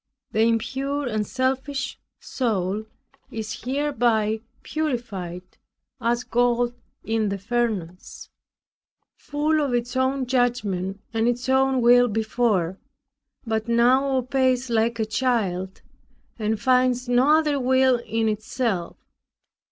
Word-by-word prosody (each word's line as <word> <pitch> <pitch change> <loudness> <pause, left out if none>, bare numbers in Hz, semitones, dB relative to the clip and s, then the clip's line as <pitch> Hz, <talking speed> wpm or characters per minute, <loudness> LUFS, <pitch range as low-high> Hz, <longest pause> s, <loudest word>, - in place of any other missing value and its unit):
The 220 - +1
impure 265 +5 0
and 215 -3 -1
selfish 265 +1 -2 0.2
soul, 215 -4 -2 0.4
is 220 0 -6
hereby 240 -6 +1 0.2
purified, 230 - -3 0.6
as 235 +1 0
gold 245 0 +1 0.3
in 220 -1 0
the 200 - -2
furnace. 200 -5 -3 0.9
Full 300 +2 0
of 275 -4 0
its 240 +1 -2
own 260 +1 +1
judgment 215 -7 -1
and 225 +1 +1
its 245 +1 -1
own 265 0 +3
will 245 +1 +6
before, 215 -5 0 0.7
but 220 0 -1
now 255 +4 +3
obeys 255 -1 +1
like 230 +1 +1
a 220 - 0
child 210 -6 -1 0.6
and 215 0 -1
finds 255 -1 +2
no 255 +5 +4
other 300 -3 +1
will 260 -1 +3
in 225 -1 -1
itself. 215 -3 -2
240 Hz, 110 wpm, -24 LUFS, 220-260 Hz, 0.9 s, will